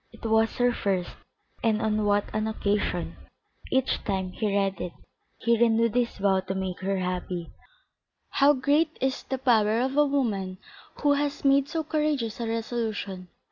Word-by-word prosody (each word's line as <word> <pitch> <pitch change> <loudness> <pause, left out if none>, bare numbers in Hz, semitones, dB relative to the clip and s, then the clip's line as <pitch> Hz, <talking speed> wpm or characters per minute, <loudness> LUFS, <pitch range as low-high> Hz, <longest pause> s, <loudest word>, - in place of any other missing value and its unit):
It 230 - -13
was 225 0 +2
her 245 0 +2
first, 190 -5 -1 0.5
and 220 -2 +2
on 215 -1 0
what 205 0 +2
an 215 0 0
occasion! 205 -4 -1 0.5
Each 265 0 +1
time 190 -2 -2
he 215 - -2
read 195 -1 0
it 180 -1 -4 0.4
he 235 0 +2
renewed 230 -1 +3
his 245 -1 0
vow 195 -1 +2
to 190 0 -4
make 190 -1 -3
her 195 +1 -1
happy. 180 -2 -3 0.8
How 285 +1 +5
great 295 +4 +1
is 265 0 0
the 265 - -4
power 225 -4 +3
of 260 +2 0
a 295 0 +4
woman 205 -10 -1 0.5
who 290 -1 +5
has 285 0 -2
made 275 0 +4
so 325 -1 -2
courageous 300 -8 -1
a 230 - -2
resolution! 220 -5 -3
225 Hz, 165 wpm, -27 LUFS, 195-265 Hz, 0.8 s, How